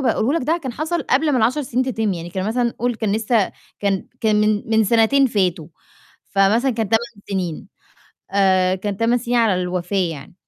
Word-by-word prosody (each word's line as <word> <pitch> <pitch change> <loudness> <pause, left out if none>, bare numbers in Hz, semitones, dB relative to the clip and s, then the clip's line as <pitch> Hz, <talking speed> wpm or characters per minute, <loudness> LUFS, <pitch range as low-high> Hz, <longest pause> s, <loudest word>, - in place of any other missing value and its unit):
باقوله 265 +3 +1
لك 260 - -5
ده 330 +2 +2
كان 260 -3 -4
حصل 315 +5 -2
قبل 290 +4 +1
ما 255 - +2
ال10 245 +6 +1
سِنين 255 0 -1
تِتِم 225 -5 -1
يعني 170 -1 -6
كان 190 +2 -3
مثلًا 235 +1 0
قل 245 +1 0
كان 220 -2 -2
لسه 220 -1 +1 0.3
كان 195 -2 -1
كان 220 -2 +2
من 210 -1 +2
من 220 0 +4
سَنتين 230 +6 +4
فاتوا 185 -9 0 0.6
فمثلا 210 +7 +2
كان 225 -3 -2
8 225 - +4 0.3
سِنين 185 -1 -3 0.6
آآ 185 -2 +3
كان 200 +1 -4
8 230 +3 +2
سِنين 245 0 -2
على 210 -6 +2
الوفاة 180 0 -1
يعني. 145 +2 -11
220 Hz, 190 wpm, -20 LUFS, 190-245 Hz, 0.6 s, من